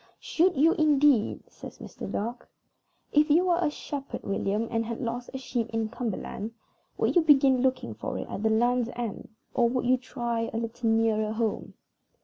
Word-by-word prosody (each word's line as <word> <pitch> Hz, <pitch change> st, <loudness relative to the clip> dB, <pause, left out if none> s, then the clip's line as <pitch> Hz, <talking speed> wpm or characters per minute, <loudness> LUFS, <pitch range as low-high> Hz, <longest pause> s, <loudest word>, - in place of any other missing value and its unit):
"Should 355 Hz, 0 st, +1 dB
you, 315 Hz, +4 st, +5 dB
indeed?" 290 Hz, -6 st, +3 dB
says -, -, -11 dB
Mr. -, -, -8 dB
Dark. 235 Hz, +4 st, -4 dB, 0.6 s
"If 300 Hz, +1 st, +4 dB
you 335 Hz, +5 st, +4 dB
were 350 Hz, -1 st, +2 dB
a 325 Hz, -, +2 dB
shepherd, 285 Hz, -1 st, -6 dB
William, 200 Hz, +3 st, -1 dB
and 230 Hz, 0 st, 0 dB
had 230 Hz, 0 st, -5 dB
lost 240 Hz, +1 st, -4 dB
a 265 Hz, -, -5 dB
sheep 240 Hz, -3 st, -3 dB
in 225 Hz, -1 st, -2 dB
Cumberland, 220 Hz, -1 st, -4 dB, 0.4 s
would -, -, +1 dB
you 350 Hz, -, +6 dB
begin 275 Hz, -4 st, +5 dB
looking 255 Hz, -, 0 dB
for 105 Hz, -, -5 dB
it -, -, -5 dB
at -, -, -5 dB
the 220 Hz, -, +2 dB
Land's 240 Hz, +2 st, +2 dB
End, 235 Hz, -4 st, -5 dB, 0.2 s
or 240 Hz, -2 st, +3 dB
would 250 Hz, +1 st, -1 dB
you 255 Hz, +1 st, +4 dB
try 235 Hz, -2 st, -3 dB
a -, -, -3 dB
little 230 Hz, 0 st, -2 dB
nearer 220 Hz, -1 st, +2 dB
home?" 220 Hz, -1 st, -2 dB
240 Hz, 180 wpm, -27 LUFS, 225-270 Hz, 0.6 s, you